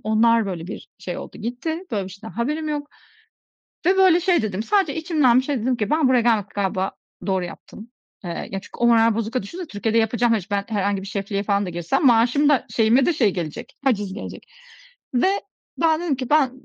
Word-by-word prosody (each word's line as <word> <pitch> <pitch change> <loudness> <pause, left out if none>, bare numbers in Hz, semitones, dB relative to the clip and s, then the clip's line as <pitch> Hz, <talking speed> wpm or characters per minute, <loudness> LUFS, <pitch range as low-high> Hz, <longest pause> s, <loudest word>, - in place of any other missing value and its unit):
Onlar, 225 +1 +3
böyle, 175 -4 -5
bir 205 - -8
şey 180 -2 -5
oldu - - -9
gitti. 250 +9 -3
Böyle 205 -4 -1
bir 190 - -9
şeyden 200 +4 -10
haberim 300 +7 -2
yok. 295 -1 -4 1.0
Ve 375 +2 +4
böyle 370 -2 +5
şey, 355 -6 +2
dedim, 205 -1 -2
sadece 380 - +1
içimden 305 -7 +3
bir 260 - +1
şey 275 -3 -1
dedim 250 +1 +1
ki 210 -3 -2
ben 305 -3 +3
buraya 255 -1 +4
gelmekle, 220 -4 +1
galiba 190 -1 -1 0.3
doğru 190 -2 0
yaptım. 210 +5 -10 0.4
Eee, 175 - -4
yani, 170 - -5
çünkü - - -14
o 240 - +3
moral 230 -1 +5
bozukluğuyla 230 +1 -2
düşünsene 345 - -7
Türkiye'de 220 +1 0
yapacağım. 230 +1 +2
Ben - - +2
hiç 185 - -15 0.2
herhangi 200 -2 0
bir - - -8
şefliğe 200 0 -3
falan 200 -1 0
da - - -4
girsem 175 - 0
maaşım 250 +5 +4
da 290 -3 +2
şeyime 235 +4 +3
de - - +3
şey 245 -10 +2
gelecek, 165 -4 -6
haciz 205 -7 0
gelecek. - - -8 0.7
Ve 250 +9 +3 0.5
ben 320 -1 +3
dedim 345 -5 0
ki, 255 -1 -5
ben 295 -3 +4
230 Hz, 205 wpm, -22 LUFS, 200-285 Hz, 1.0 s, böyle